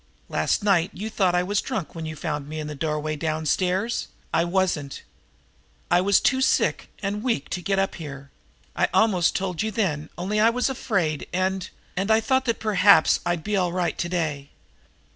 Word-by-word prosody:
Last 80 - 0
night 190 -4 +3
you 215 +5 -5
thought 185 -4 +2
I 180 - +2
was 200 +2 0
drunk 220 -11 -4
when 165 -1 -5
you 155 - -5
found 150 -2 -4
me 155 0 -5
in 155 - -4
the 150 - -5
doorway 150 +1 -2
downstairs. 175 +7 -1 0.3
I 165 - +3
wasn't. 175 -6 -1 0.9
I 175 +1 +5
was 200 +1 +4
too 260 0 +2
sick - - +1
and 205 +1 -2
weak 230 - -1
to 180 - -3
get 195 +2 0
up 195 0 +1
here. 140 -3 -9 0.4
I - - +2
almost 190 -6 +3
told 185 -3 -2
you 220 - 0
then, 165 -9 -1
only 200 +4 -1
I 220 +2 +6
was 250 +3 0
afraid, 185 - -1
and 185 +1 -1 0.3
and 195 +3 -1
I 220 0 +5
thought 260 +4 +1
that 230 -3 0
perhaps 205 -5 +5
I'd 175 -2 -1
be 210 0 -1
all 180 -3 +1
right 180 -1 -1
to 175 - -1
day." 155 -5 -2
180 Hz, 190 wpm, -24 LUFS, 155-205 Hz, 0.9 s, I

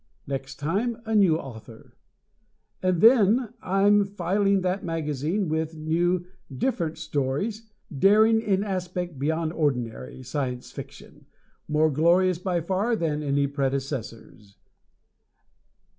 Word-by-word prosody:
Next 135 -1 -5
time 200 - -1
a 225 - -3
new 190 -7 +4
author. 115 -5 -11 0.9
And 185 -2 +1
then 230 0 +5
I'm 200 +2 +3
filling 195 +1 0
that 185 +2 -1
magazine 165 +3 -2
with 160 +1 -2
new 170 +3 0 0.3
"different" 165 - -2
stories, 160 +9 -2 0.3
daring 215 +7 +5
in 200 -3 +1
aspect 180 -5 -4
beyond 160 +3 -1
ordinary 125 - -2
Science 130 -1 -4
Fiction, - - -11 0.4
more 155 +1 +2
glorious 170 +4 +3
by 180 -2 -1
far 195 +7 0
than 155 -6 -1
any 140 -1 +1
predecessors. 135 -7 -4
165 Hz, 110 wpm, -25 LUFS, 140-195 Hz, 0.9 s, then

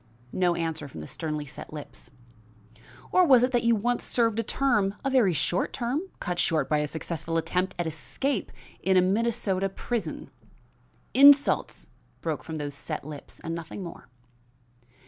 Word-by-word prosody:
No 180 -2 +2
answer 160 -3 -3
from 105 - -9
the 75 - -8
sternly 155 -2 -4
set 145 - -9
lips. 150 -1 -10 1.0
"Or 370 - +5
was 260 -7 +6
it 255 - +2
that 240 -2 +2
you 235 0 +4
once 240 +3 0
served 230 -2 +1
a - - +1
term 215 -6 +1
a 270 - +1
very 245 -8 +4
short 170 +3 0
term, 255 +4 -1 0.2
cut 175 0 -3
short 160 -2 +1
by 150 - +2
a 150 - 0
successful 165 +1 -3
attempt 180 +3 -1
at 175 - -1
escape 165 - -2 0.3
in 190 0 +3
a - - +7
Minnesota 195 -1 +1
prison?" 195 -3 -4 0.8
"Insults!" 280 +1 +5 0.3
broke 160 -3 -3
from 160 -1 -5
those 145 -1 -4
set 140 - -5
lips 150 -1 -9
and 165 - -4
nothing 165 +4 -6
more. 170 -7 -10
185 Hz, 165 wpm, -27 LUFS, 160-235 Hz, 1.0 s, a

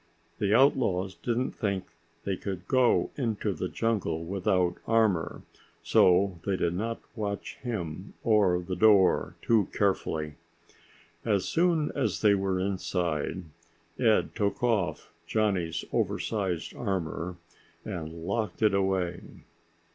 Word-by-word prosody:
The 100 -1 +1
outlaws 110 -7 +3
didn't 120 +4 -1
think 100 -3 -2 0.4
that 100 - -2
he - - +1
could 95 -1 -6
go 130 -2 +3
into 115 -6 -1
the - - -3
jungle 90 -8 -1
without 95 -1 0
armor, 110 -7 +1 0.4
so 90 0 +4
they 100 - 0
did 85 -2 0
not 115 +5 -2 0.2
watch 100 -3 -4
him 95 -7 -5
or 105 -5 +4
the 90 +1 -4
door 100 -1 +4
too 110 -5 +3
carefully. 80 -7 -1 0.9
As 100 -5 +1
soon 165 -3 +2
as 140 - -1
they 105 -2 +5
were 95 -1 0
inside, 90 -3 -2 0.6
Ed 110 -4 +3
took 105 +1 -1
off 100 -11 0
Johnny's 95 -7 0
oversized 95 -6 -1
armor 90 -4 -3 0.5
and 80 0 -6
locked 105 +1 -2
it 105 -2 +4
away. 95 -3 0
100 Hz, 120 wpm, -28 LUFS, 90-110 Hz, 0.9 s, they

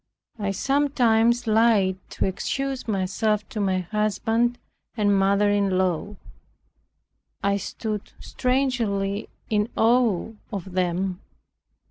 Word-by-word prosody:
I 200 -1 -1
sometimes 240 -1 +2
lied 215 -4 +3
to - - -2
excuse 270 +8 -2
myself 210 +1 0
to 235 -5 -5
my 190 -2 +1
husband 225 +4 0 0.4
and 205 -2 +3
mother 200 +1 +3
in 200 -2 +1
law. 185 +2 -1 1.3
I 200 0 +2
stood 210 +1 -5
strangely 230 -6 -1 0.2
in 210 +1 +1
awe 225 -4 +3 0.2
of 195 -3 -5
them. 180 +1 -1
210 Hz, 100 wpm, -24 LUFS, 195-230 Hz, 1.3 s, lied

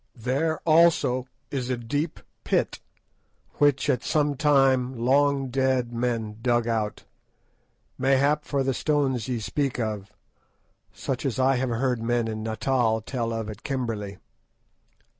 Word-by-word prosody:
There, 140 +7 0
also, 155 -6 +4 0.2
is 130 -3 -2
a 125 - 0
deep 145 +7 -3 0.2
pit, - - 0 0.8
which, 145 -2 +3
at 125 - +1
some 150 -2 +1
time, 135 -3 +3
long 135 +2 +2
dead 130 -2 0
men 115 -3 -2
dug 120 -1 +1
out, 110 -2 -2 1.0
mayhap 135 +3 +3
for 140 -2 -1
the 135 0 0
stones 135 -5 0
ye 125 -2 -1
speak 135 +4 -2
of, 105 -3 -3 0.8
such 120 +6 -4
as 135 -4 -1
I 130 0 +3
have 130 0 -1
heard 120 0 0
men 120 0 0
in 110 -1 -4
Natal 110 +1 +1
tell 115 0 -3
of 115 -1 -3
at 110 -1 -8
Kimberley. 115 -7 -3
125 Hz, 135 wpm, -26 LUFS, 115-135 Hz, 1.0 s, also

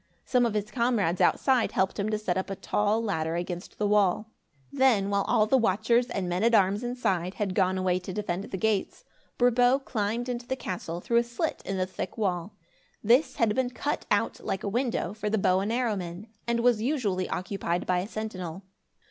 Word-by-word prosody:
Some 245 -2 +3
of 220 - -3
his 210 0 -2
comrades 235 -8 +1
outside 260 -4 +3
helped 190 +2 0
him 200 +2 0
to 215 - 0
set 200 -4 -1
up 190 +1 -2
a 195 - -3
tall 210 +3 0
ladder 160 -6 -1
against 175 +1 -5
the 210 - 0
wall. 210 +1 +2 0.4
Then, 245 -8 +3
while 200 0 +2
all 215 - +4
the 260 +5 +3
watchers 230 +3 +2
and 195 -7 -3
men 180 +3 -1
at 230 0 +4
arms 200 +2 +3
inside, 195 -7 -1
had 200 -3 -2
gone 185 -1 +2
away 185 -1 +1
to 185 +1 -7
defend 195 -1 -3
the 190 - -5
gates, 220 - -1 0.3
Brabo 245 +1 +4
climbed 225 +2 -2
into 240 -1 -4
the 260 - -1
castle, 175 -7 -5
through 235 - +1
a 235 - +5
slit 240 +7 -3
in 195 - -2
the 185 - +1
thick 185 - -6
wall. 190 -2 -2 0.5
This 240 +8 +4
had 225 -3 +2
been 255 +1 0
cut 285 +4 -3
out, - - +1
like 190 - -3
a - - -2
window, 230 -4 -1
for 210 0 -3
the 220 - +1
bow 185 -2 +3
and 200 +3 -1
arrow 235 -2 +1
men, 180 +3 -6 0.2
and 235 0 +1
was 240 -3 +3
usually 220 -9 -1
occupied 180 -2 -2
by 180 -1 +1
a 185 - -3
sentinel. 195 -5 -5
210 Hz, 205 wpm, -27 LUFS, 185-235 Hz, 0.5 s, a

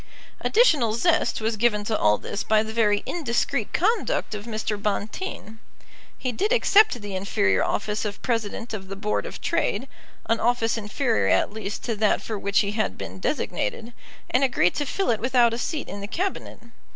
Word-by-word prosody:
Additional 295 - +3
zest 330 -1 +2
was 220 +1 0
given 210 -2 +2
to 215 +1 -1
all 105 - +3
this 205 - -4
by 215 0 +3
the 220 0 -6
very 210 -3 +2
indiscreet 245 -6 -1
conduct 430 - 0
of 210 0 -6
Mr. 220 -2 -2
Bonteen. 215 - -4 0.6
He 255 - -2
did 405 - -1
accept 435 - +5
the 205 -1 -5
inferior 100 - +1
office 210 0 -1
of 205 -2 -4
President 230 -1 -2
of 190 -3 -5
the 195 - -6
Board 210 +1 -2
of - - -9
Trade, - - 0 0.4
an 230 - +1
office 235 -1 +1
inferior 225 +2 0
at - - +2
least 210 -2 -5
to 230 - -2
that 215 0 +2
for 215 -3 -5
which 200 +1 +2
he 200 - -1
had 210 - -1
been 95 -1 -7
designated, 225 - -2 0.4
and 255 - +3
agreed 215 -9 +3
to 290 - -2
fill 390 -3 0
it 220 - 0
without 240 -1 +3
a 230 - -3
seat 310 +3 -3
in 200 - -7
the 200 - -5
Cabinet. 370 - -3
220 Hz, 185 wpm, -24 LUFS, 205-245 Hz, 0.6 s, accept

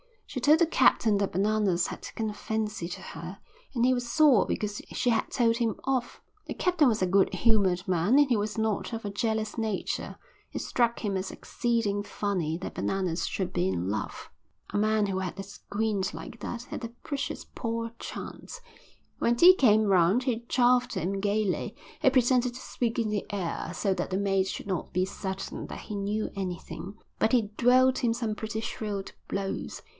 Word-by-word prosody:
She 265 - -5
told 300 +5 +5
the 340 - +6
captain 225 -9 +4
that 200 -1 -1
Bananas 200 -2 +2
had - - -7
taken 220 -1 -4
a - - -5
fancy 215 -3 -3
to 175 - -7
her 170 +4 -8 0.4
and 240 0 +3
he 255 - +5
was 245 -1 -2
sore 290 -6 +5
because 210 -1 -2
she 250 - +1
had 230 - +1
told 230 -2 +2
him 230 -3 0
off. 260 -2 -1 0.3
The - - -3
captain 350 -5 +3
was 220 -4 +1
a - - +4
good 190 +1 +3
humoured 190 -2 +2
man 185 +6 +3
and 290 -1 +5
he 240 - +3
was 210 +1 -2
not 220 +1 -1
of 225 - -4
a 205 - -3
jealous 220 +1 -1
nature; 220 -3 -2 0.4
it - - -3
struck 235 -1 +1
him 200 -3 0
as 190 - -3
exceeding 230 -4 -1
funny 185 -6 -2
that 185 - -6
Bananas 185 -3 -1
should 190 -2 -2
be 90 - +1
in 90 0 -1
love. 105 0 -4 0.4
A - - +1
man 215 0 +2
who 190 -1 -1
had 185 0 -4
a 195 - -4
squint 200 0 -2
like 230 - -8
that 235 +3 -5
had 245 - -6
a - - -5
precious 285 -2 -4
poor 230 -1 -3
chance. - - -7 0.6
When 235 - +2
tea 350 +9 +9
came 220 - +4
round 195 +3 +4
he 235 -3 -1
chaffed 250 0 +3
him 195 +4 -1
gaily. 205 -1 0 0.3
He - - +6
pretended 250 -1 +3
to 260 - -8
speak 235 -2 -2
in 230 -2 +1
the 210 -2 -1
air, 190 -5 -3
so 195 -2 +1
that 175 - -2
the 185 - -1
mate 195 -1 +1
should - - -5
not 185 -4 -3
be 185 +1 +2
certain 190 0 -5
that - - -7
he 210 - -6
knew 205 +2 -2
anything, 190 +1 -5 0.2
but 220 - +2
he 220 -5 +2
dealt 255 +1 +5
him 235 -3 +2
some 230 -2 -2
pretty 220 +1 -4
shrewd 205 -3 -4 0.2
blows. 195 -1 -3
215 Hz, 195 wpm, -28 LUFS, 195-235 Hz, 0.6 s, tea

